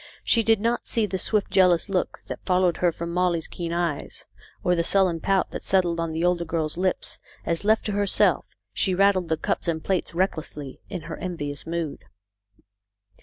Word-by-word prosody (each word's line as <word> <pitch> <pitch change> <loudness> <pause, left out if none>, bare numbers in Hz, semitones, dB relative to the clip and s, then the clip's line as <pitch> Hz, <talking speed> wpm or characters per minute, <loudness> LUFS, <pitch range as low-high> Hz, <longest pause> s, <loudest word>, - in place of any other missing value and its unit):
She 230 - +4
did 225 -1 +3
not 230 +3 -1
see 225 -2 +1
the 190 -2 -3
swift 210 +1 +1
jealous 180 -2 +4
look 190 -2 -2
that - - -7
followed 180 -2 +2
her 175 -1 +2
from 170 +1 -5
Molly's 175 -2 +1
keen 170 -1 -5
eyes, 170 -4 -3 0.4
or 180 - +3
the 170 -1 +1
sullen 185 -2 +2
pout 195 +2 +1
that - - -5
settled 175 -3 +1
on 165 -1 -1
the 160 +2 -1
older 175 -1 +2
girl's 160 -2 -2
lips, 185 +1 -1 0.3
as, 170 +3 -1
left 220 +2 +2
to 210 - -1
herself, 200 -1 +3 0.3
she 190 -2 +1
rattled 190 -3 +3
the 160 - +1
cups - - -2
and 160 -2 -1
plates 185 -3 -1
recklessly, 155 -6 -2
in 185 -4 -5
her - - -7
envious 145 -6 -5
mood. 165 -3 -3
180 Hz, 185 wpm, -25 LUFS, 165-190 Hz, 0.4 s, She